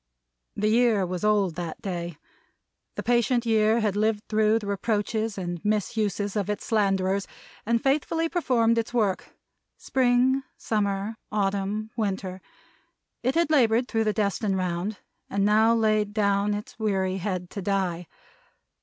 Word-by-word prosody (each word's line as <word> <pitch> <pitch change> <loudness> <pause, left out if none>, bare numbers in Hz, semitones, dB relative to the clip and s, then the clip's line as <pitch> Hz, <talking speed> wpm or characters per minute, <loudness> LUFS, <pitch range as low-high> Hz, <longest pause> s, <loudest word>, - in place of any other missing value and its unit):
The 210 - 0
Year 225 -4 +3
was 180 +2 -4
Old, 205 -4 +2
that 170 -2 -5
day. 175 -4 -5 0.8
The - - -4
patient 240 0 +2
Year 220 0 +3
had 210 -2 0
lived 215 0 +1
through 215 0 +3
the 220 - -5
reproaches 210 +1 -1
and 175 -3 -4
misuses 210 -1 -1
of 205 -2 -1
its 210 - -3
slanderers, 195 -3 +1 0.4
and 230 0 +1
faithfully 305 +4 +1
performed 240 -9 +2
its 230 +2 -4
work. 205 -5 0 0.4
Spring, 255 +1 +2 0.2
summer, 205 0 -1
autumn, 205 +1 -1
winter. 190 -4 -3 0.8
It 255 +4 0
had 335 -2 +2
labored 240 -4 +3
through 225 -3 0
the 215 - +2
destined 200 -1 0
round, 185 +3 -2 0.3
and 200 0 +1
now 220 +2 +4
laid 215 -2 +1
down 200 -1 +2
its 210 +2 -8
weary 190 -3 0
head 185 -2 -3
to 200 - -5
die. 180 -3 -1
210 Hz, 140 wpm, -26 LUFS, 195-225 Hz, 0.8 s, now